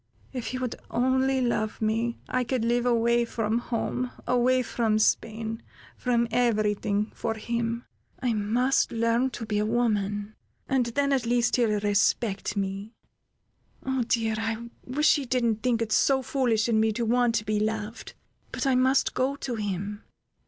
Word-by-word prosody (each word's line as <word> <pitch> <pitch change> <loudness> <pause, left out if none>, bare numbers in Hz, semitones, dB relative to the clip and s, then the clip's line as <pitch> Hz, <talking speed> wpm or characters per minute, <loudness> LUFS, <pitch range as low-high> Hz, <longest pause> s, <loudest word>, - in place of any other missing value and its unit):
If 250 -3 -4
he 255 - -3
would 255 -2 -3
only 260 +2 +2
love 215 -3 -1
me, 225 +2 0
I 255 0 0
could 245 -1 -1
live 240 +1 +1
away 235 0 +3
from 225 -1 -1
home, 245 +1 -2 0.2
away 250 +1 +3
from 225 -2 0
Spain, 220 +1 0 0.3
from 235 -2 +1
every 220 -3 +2
thing, 205 0 -1
for 225 - -3
him! 235 +1 -2 0.3
I 245 -3 0
must 230 +5 +1
learn 230 +3 +1
to 235 -2 -6
be 210 -1 -1
a 210 - +1
woman, 210 -3 0 0.3
and 260 -3 +1
then, 280 +4 +1
at 255 -4 0
least 240 +1 +2
he'll 220 -4 +2
respect 205 0 +1
me. 195 +3 -3 0.9
"Oh, 265 -1 0
dear! 225 -1 +1
I 225 +1 -3
wish 300 +5 +3
he 285 - -3
didn't 235 -3 +1
think 235 -2 +1
it 220 - -6
so 265 +3 +3
foolish 240 -5 +1
in 225 -2 +2
me 220 0 +3
to 235 +2 -1
want 240 0 +2
to 215 - 0
be 215 0 0
loved! 215 +1 -3 0.4
But - - -3
I 270 - +3
must 260 +2 +3
go 265 +2 0
to 275 -3 -4
him. 205 -1 -3
235 Hz, 165 wpm, -27 LUFS, 215-250 Hz, 0.9 s, away